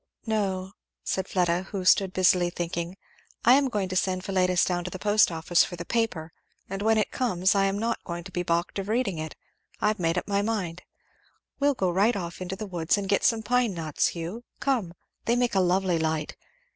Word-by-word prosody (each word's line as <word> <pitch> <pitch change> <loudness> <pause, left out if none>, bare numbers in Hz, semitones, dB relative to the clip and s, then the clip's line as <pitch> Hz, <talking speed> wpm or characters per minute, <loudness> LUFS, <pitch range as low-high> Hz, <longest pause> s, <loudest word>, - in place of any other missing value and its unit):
'" - - -54
"No," 195 -4 -1 0.3
said 190 0 -2
Fleda, 180 0 0
who 200 - -4
had 185 -1 -2
stood 190 0 +5
busily 180 -1 +3
thinking, 175 +1 -4 0.5
"I 240 - +8
am 275 0 +4
going 205 -5 -1
to 185 - -3
send 185 0 0
Philetus 185 -2 +2
down 175 -1 -1
to 180 - -4
the 185 - -6
post 210 0 +3
office 165 +1 +3
for 175 - -5
the 170 0 -7
paper, 195 -9 -1 0.4
and 195 +1 -5
when 220 +1 +3
it 215 - 0
comes 190 -7 +1
I 195 -1 +3
am 195 +1 0
not 230 +2 -1
to 175 +2 -6
be 175 - -2
balked 170 +2 -1
of 195 +1 -5
reading 220 -7 0
it 155 0 -5 0.4
I've 210 0 +1
made 165 0 +1
up - - -2
my 200 0 +1
mind! 195 -6 -2 0.8
We'll 285 0 +3
go 185 -6 0
right 205 +7 +3
off 175 -2 -5
into 185 +1 -4
the 215 - -6
woods 175 -2 0
and 200 -1 -3
get 200 +1 +1
some 225 -3 +2
pine 245 -4 +1
knots, 155 -3 0
Hugh 175 +8 -5 0.2
come! 225 -11 -1 0.3
They 235 - +2
make 245 -1 +1
a 195 - +3
lovely 180 -1 +2
light. 160 -1 -1
190 Hz, 215 wpm, -27 LUFS, 175-210 Hz, 0.8 s, I